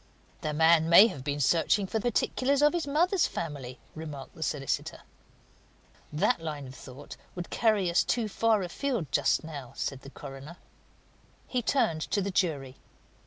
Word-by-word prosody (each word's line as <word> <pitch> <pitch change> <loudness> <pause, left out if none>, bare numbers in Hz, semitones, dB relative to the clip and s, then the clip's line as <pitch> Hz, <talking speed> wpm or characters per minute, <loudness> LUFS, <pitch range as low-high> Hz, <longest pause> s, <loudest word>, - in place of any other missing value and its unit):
"The 155 - -2
man 160 +1 +4
may 170 +5 +9
have 140 - -4
been 145 +1 -2
searching 170 +7 +2
for 220 +4 -2
particulars 255 +5 +1
of 295 - +5
his 340 -4 -2
mother's 345 +6 +2
family," 140 -6 -6 0.2
remarked 150 -4 -8
the 165 - -13
solicitor. 140 -4 -2 1.1
"That 165 +7 +1
line 150 -3 -5
of 130 - -10
thought 135 +2 -11 0.2
would 175 -1 -6
carry 215 -5 +2
us 170 0 +3
too 235 -3 0
far 220 -1 +1
afield 185 - -3
just - - +2
now," 145 -6 -8
said 135 -1 -4
the 135 - -11
coroner. 135 +5 -10 0.9
He 250 - -1
turned 170 - +1
to 205 - -1
the 200 0 -2
jury. 145 -8 -1
165 Hz, 160 wpm, -29 LUFS, 145-220 Hz, 1.1 s, may